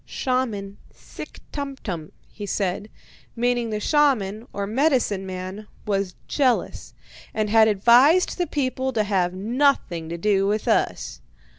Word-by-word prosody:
"'Shaman 225 -7 -2
SICK - - -11
TUMTUM,' 255 - -5 0.2
he 205 -1 -7
said, 195 +2 -2 0.5
meaning 240 0 0
the 215 -1 -2
shaman, 235 -5 +1
or 200 - -3
medicine 230 -5 +1
man, 185 +3 -6 0.2
was 195 -3 -1
jealous, 260 -4 0 0.4
and 215 -1 0
had 220 -1 +6
advised 245 - +4
the 355 - +1
people 260 -2 -1
to 215 - +2
have 185 -3 0
nothing 210 - 0
to 170 - -4
do 195 +1 +2
with 210 +1 -1
us. - - 0
215 Hz, 130 wpm, -23 LUFS, 195-255 Hz, 0.5 s, had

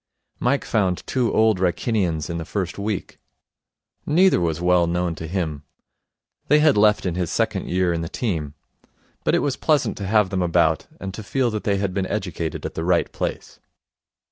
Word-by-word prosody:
Mike 135 +3 +1
found 95 -5 0
two 125 -3 0
Old 110 -3 +3
Wrykinians 90 -3 0
in 85 0 -4
the - - -4
first 95 +3 -4
week. 105 -1 -4 0.8
Neither 175 - +4
was 80 -2 0
well 90 -1 +3
known 85 0 0
to 80 0 -7
him. 80 -5 -2 0.9
They 150 - +5
had 150 -2 +4
left 105 0 +4
in 90 - 0
his 90 -2 -2
second - - -1
year 90 -1 +1
in 85 - -2
the 80 - -4
team. 80 - -3 0.7
But - - +2
it - - +1
was 140 -3 -1
pleasant 150 -4 +1
to 100 - -4
have 105 -2 +3
them 95 -1 0
about, 85 -3 +2
and 95 -1 -6
to 110 - -6
feel 120 +3 0
that 110 -1 -4
they 100 -1 +2
had 100 -1 -1
been 95 -1 -1
educated 90 -6 -3
at - - -4
the 80 - -3
right 85 0 +1
place. - - -5
95 Hz, 190 wpm, -22 LUFS, 85-110 Hz, 0.9 s, They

